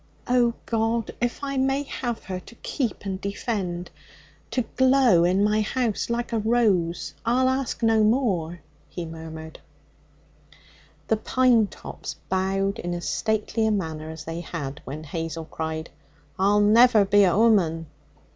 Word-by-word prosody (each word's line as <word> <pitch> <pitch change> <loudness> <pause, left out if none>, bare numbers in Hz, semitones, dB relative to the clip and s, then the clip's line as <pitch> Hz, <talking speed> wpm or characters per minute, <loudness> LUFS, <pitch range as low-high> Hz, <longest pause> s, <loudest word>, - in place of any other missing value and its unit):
'Oh, 245 -1 +3
God, 225 0 0
if 240 +3 -2
I 275 -1 -2
may 270 +2 +1
have 240 -4 -4
her 185 -1 -5
to 235 - -15
keep 240 -4 -3
and 190 -1 -3
defend, 195 -4 -3 0.6
to 250 - 0
glow 260 -8 +5
in 185 +3 +3
my 210 +1 +2
house 230 0 -1
like 235 0 -2
a 225 - +2
rose, 190 -10 +1
I'll 250 +3 +2
ask 260 -2 -1
no 225 -1 +4
more,' 190 - +1 0.3
he 175 - -5
murmured. 160 -1 -9 1.5
The 220 - +2
pine 240 -1 +3
tops - - -8
bowed 195 +2 0
in 175 0 -3
as 175 - -5
stately 220 0 0
a - - +2
manner 160 -6 -3
as 160 -1 -8
they 165 +2 -5
had 145 -4 -6
when 150 +3 -6
Hazel 165 +1 -5
cried, 160 0 -5 0.5
'I'll 205 +2 +4
never 220 0 +6
be 205 +1 +5
a 180 -1 +3
woman!' 185 -8 +3
205 Hz, 145 wpm, -25 LUFS, 170-235 Hz, 1.5 s, never